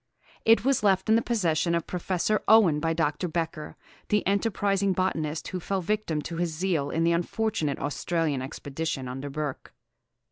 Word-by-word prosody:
It 225 +2 +5
was 275 -3 +3
left 195 -1 +2
in 220 - +6
the 230 - +4
possession 170 -8 +1
of 170 - -1
Professor 185 +3 -1
Owen 200 -9 +6
by 165 +1 0
Dr. 165 +1 0
Becher, 165 -2 -4 0.3
the 210 -1 +2
enterprising 200 -1 +1
botanist, 160 -4 -1
who 185 - -4
fell 195 +3 -2
a - - -1
victim 170 -6 -1
to 170 - -5
his 175 -1 0
zeal 160 -3 -1
in 165 - 0
the 170 - +3
unfortunate 170 -3 -1
Australian 150 -1 -1
expedition 140 0 -4
under 135 +3 -5
Burke. 150 -1 -5
170 Hz, 170 wpm, -27 LUFS, 155-200 Hz, 0.3 s, in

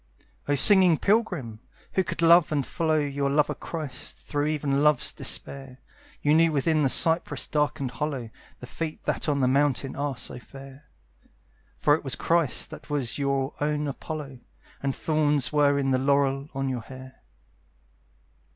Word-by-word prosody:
O 145 - +2
singing 185 +1 +7
pilgrim! 180 - -1 0.3
who 190 - +2
could 170 -1 -4
love 170 -1 +5
and 145 -3 0
follow 160 -1 -1
Your 140 -1 -1
lover 145 +1 +1
Christ, 150 -7 -6
through 145 0 -3
even 145 -2 -1
love's 150 -3 +2
despair, 135 -2 -4 0.5
You 150 - +3
knew 165 +1 +4
within 155 +2 +1
the 135 - +2
cypress 165 +5 +2
darkened 145 -3 -1
hollow 135 -6 -4 0.3
The - - -7
feet 160 +4 -6
that - - -1
on 140 -1 0
the 130 - +3
mountain 135 0 +1
are 140 -2 -3
so - - -3
fair. 135 +3 -14 0.9
For 145 - +3
it 155 - 0
was 135 -4 -2
Christ 165 -4 0
that - - -11
was 145 -3 -2
your 140 -1 -1
own 150 0 -1
Apollo, 140 -1 -7 0.4
And 135 -1 -2
thorns 150 -3 0
were 145 -1 +3
in 135 -1 0
the 130 - +2
laurel 140 +1 +1
on 135 0 -2
your 130 -3 -3
hair. 130 +2 -13
145 Hz, 160 wpm, -25 LUFS, 135-155 Hz, 0.9 s, singing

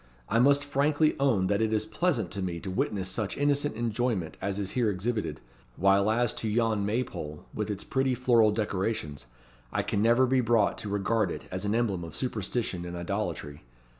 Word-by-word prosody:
I 115 - +3
must 140 +3 +5
frankly 145 +2 +2
own 120 -9 +3
that 100 +3 +1
it 110 -1 +1
is 110 -1 +1
pleasant 120 - 0
to 100 - -3
me 90 -2 -3
to 95 - -5
witness 95 0 -1
such 100 +2 -3
innocent 145 -2 +1
enjoyment 115 -6 -1
as 100 0 -2
is 100 -2 -3
here 120 -4 +1
exhibited; 100 -5 -2 0.3
while 100 +2 +3
as 120 +1 +2
to 110 - -2
yon 110 -1 +1
May 115 +5 +1
pole, 75 -9 -8
with 105 -1 -3
its 105 - -4
pretty 130 -1 0
floral 120 -3 +4
decorations, 105 - -2 0.4
I - - 0
can 100 - -1
never 120 +4 +5
be 130 0 +2
brought 115 -3 +2
to 105 - -5
regard 105 +2 +1
it - - -5
as 95 +2 -4
an 105 +2 +1
emblem 105 -7 0
of 85 - -8
superstition 110 -6 -2
and 90 0 -6
idolatry. 85 -5 -4
110 Hz, 195 wpm, -28 LUFS, 95-120 Hz, 0.4 s, must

